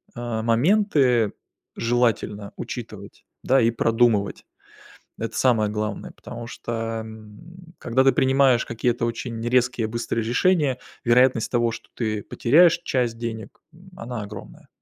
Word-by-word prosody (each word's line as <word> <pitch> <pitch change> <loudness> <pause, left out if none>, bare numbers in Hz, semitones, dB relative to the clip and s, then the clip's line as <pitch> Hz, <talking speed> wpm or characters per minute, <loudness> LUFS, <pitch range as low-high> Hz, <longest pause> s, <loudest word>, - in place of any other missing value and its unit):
э, 120 -2 -3
моменты 125 - +2 0.5
желательно 115 -4 0
учитывать, - - -8 0.2
да, 135 +1 +3
и 115 0 +3
продумывать. 115 -3 +1 0.8
Это 115 -1 -4
самое 110 -3 +2
главное. 105 0 -4
Потому 120 -1 -9
что, 120 - -7 0.3
м, 110 - -13
когда 130 +3 +1
ты 135 - +5
принимаешь 130 -1 +3
какие-то 120 0 -1
очень 115 0 -5
резкие 120 -2 +1
быстрые 115 0 -2
решения, 140 +2 +2 0.3
вероятность 125 -1 +3
того, 120 -1 +1
что - - -10
ты 110 -3 -2
потеряешь 165 - +4
часть 120 -4 -1
денег- 115 -2 -6 0.4
она 120 -2 -6
огромная. 100 -1 -11
120 Hz, 120 wpm, -23 LUFS, 110-130 Hz, 0.8 s, ты